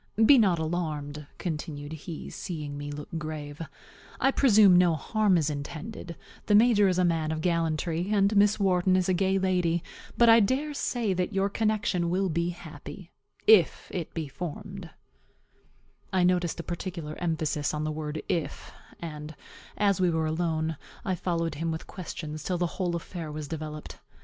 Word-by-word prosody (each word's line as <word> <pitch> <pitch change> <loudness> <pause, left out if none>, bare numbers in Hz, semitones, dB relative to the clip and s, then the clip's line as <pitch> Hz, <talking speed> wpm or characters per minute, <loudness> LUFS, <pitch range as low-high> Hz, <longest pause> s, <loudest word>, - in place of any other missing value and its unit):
Be 275 +2 +8
not 190 -6 +4
alarmed," 155 -3 -3
continued 150 -3 -5
he, 160 +1 -7
seeing 150 -5 -5
me 145 0 -5
look 145 0 -7
grave; 155 -1 -6 0.6
"I 270 - +4
presume 215 -9 +6
no 175 -2 +5
harm 200 +5 +2
is 155 -3 +1
intended; 170 +5 -6 0.3
the 210 - +5
major 215 -2 +6
is 185 -1 +1
a 185 - +3
man 160 -2 +1
of 160 0 -2
gallantry, 165 +1 0
and 200 0 +3
Miss 205 +1 +4
Wharton 185 -1 +3
is 185 -1 +2
a 185 - +3
gay 190 +1 +2
lady; 180 -3 +1 0.3
but 235 - +6
I 225 0 +8
dare 265 +8 +1
say 235 -7 -1
that 180 +3 -1
your 195 +1 +1
connection 210 -5 0
will 190 +2 +1
be 170 +1 0
happy, 170 +1 -9 0.3
if 210 -7 +5
it 175 -4 -3
be 160 -3 -3
formed" 180 +5 -7 1.2
I 185 -2 +2
noticed 180 -2 +1
a - - -3
particular 170 -3 -5
emphasis 155 -3 -1
on 150 0 -2
the 155 - -1
word 155 0 -4
if; 165 - -3 0.3
and, 150 -2 -7 0.4
as 200 -3 +2
we 180 - +4
were 160 -1 0
alone, 160 -1 -1 0.3
I 190 - 0
followed 170 -2 -1
him 165 - 0
with 160 0 -4
questions 155 -4 -6
till 180 - -1
the 175 - +1
whole 175 0 -2
affair 170 -2 -6
was 150 -1 -5
developed. 155 0 -6
170 Hz, 170 wpm, -28 LUFS, 155-190 Hz, 1.2 s, Be